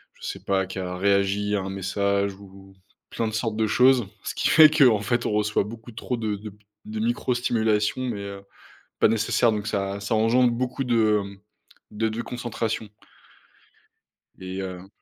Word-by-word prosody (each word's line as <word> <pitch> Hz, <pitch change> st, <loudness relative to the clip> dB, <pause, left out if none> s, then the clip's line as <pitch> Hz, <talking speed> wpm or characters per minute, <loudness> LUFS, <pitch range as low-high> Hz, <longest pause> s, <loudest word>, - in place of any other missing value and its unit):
je -, -, -19 dB
sais -, -, -6 dB
pas, 95 Hz, -1 st, 0 dB
qui 95 Hz, -, -8 dB
a 90 Hz, -1 st, -4 dB
réagi 100 Hz, +1 st, +1 dB
à 100 Hz, -, 0 dB
un 95 Hz, -, -5 dB
message 100 Hz, +1 st, 0 dB
ou 95 Hz, -1 st, -15 dB, 0.4 s
plein 115 Hz, -, -1 dB
de 110 Hz, -, -5 dB
sortes 110 Hz, -1 st, -2 dB
de 110 Hz, -, +2 dB
choses 125 Hz, +2 st, +4 dB, 0.2 s
ce -, -, -5 dB
qui -, -, +1 dB
fait 155 Hz, -1 st, +8 dB
que, 155 Hz, -1 st, +4 dB
en 110 Hz, -4 st, +4 dB
fait, 120 Hz, +2 st, -1 dB
on -, -, 0 dB
reçoit 105 Hz, 0 st, +1 dB
beaucoup 115 Hz, +2 st, -10 dB
trop 125 Hz, +2 st, -3 dB
de 110 Hz, -2 st, -2 dB
de 105 Hz, -1 st, -9 dB, 0.3 s
de 110 Hz, 0 st, -5 dB
micro 120 Hz, +2 st, 0 dB
stimulation 110 Hz, -1 st, +1 dB
mais 115 Hz, -5 st, -3 dB
heu, 100 Hz, 0 st, -7 dB, 0.6 s
pas -, -, +6 dB
nécessaire, 115 Hz, +2 st, +2 dB
donc 105 Hz, -1 st, -3 dB
ça, 100 Hz, -1 st, -2 dB
ça 100 Hz, +3 st, -2 dB
engendre 120 Hz, +3 st, +3 dB
beaucoup 130 Hz, +3 st, -2 dB
de 110 Hz, -4 st, +2 dB, 0.7 s
de 110 Hz, +1 st, 0 dB
déconcentration 115 Hz, -1 st, -4 dB, 1.5 s
et 95 Hz, 0 st, -6 dB
heu 95 Hz, 0 st, -7 dB
110 Hz, 175 wpm, -25 LUFS, 100-115 Hz, 1.5 s, fait